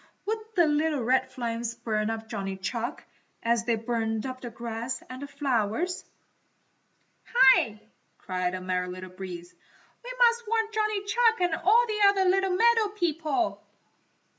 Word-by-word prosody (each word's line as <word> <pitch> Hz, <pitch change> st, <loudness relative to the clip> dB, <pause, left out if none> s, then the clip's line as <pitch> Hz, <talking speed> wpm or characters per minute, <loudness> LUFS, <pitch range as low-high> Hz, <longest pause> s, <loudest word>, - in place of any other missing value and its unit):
Would 440 Hz, +2 st, -1 dB, 0.2 s
the 345 Hz, -3 st, +5 dB
little 300 Hz, -2 st, +1 dB
red 260 Hz, +2 st, +2 dB
flames 230 Hz, -2 st, -3 dB
burn 220 Hz, -2 st, -1 dB
up 225 Hz, 0 st, -4 dB
Johnny 195 Hz, -3 st, -4 dB
Chuck, 230 Hz, +5 st, -4 dB, 0.4 s
as 230 Hz, 0 st, +1 dB
they 235 Hz, -1 st, +2 dB
burned 225 Hz, 0 st, -2 dB
up 255 Hz, -1 st, -6 dB
the 240 Hz, -, -6 dB
grass 235 Hz, +2 st, -5 dB
and 255 Hz, +1 st, -8 dB
the 285 Hz, -, -5 dB
flowers? 275 Hz, -, -1 dB, 1.3 s
"Hi!" 260 Hz, -, +5 dB, 0.4 s
cried 185 Hz, -1 st, -2 dB
the 185 Hz, -, -5 dB
Merry 180 Hz, 0 st, -1 dB
Little 185 Hz, 0 st, -8 dB
Breeze, 180 Hz, -2 st, -8 dB, 0.5 s
"We -, -, -8 dB
must 475 Hz, -1 st, +3 dB
warn 450 Hz, 0 st, +1 dB
Johnny 430 Hz, -2 st, 0 dB
Chuck 455 Hz, +1 st, +2 dB
and 350 Hz, -2 st, +2 dB
all 440 Hz, +9 st, +4 dB
the 430 Hz, -2 st, -3 dB
other 390 Hz, -1 st, +2 dB
little 380 Hz, 0 st, +2 dB
meadow 455 Hz, +1 st, +4 dB
people!" 330 Hz, -3 st, -1 dB
255 Hz, 150 wpm, -27 LUFS, -, 1.3 s, the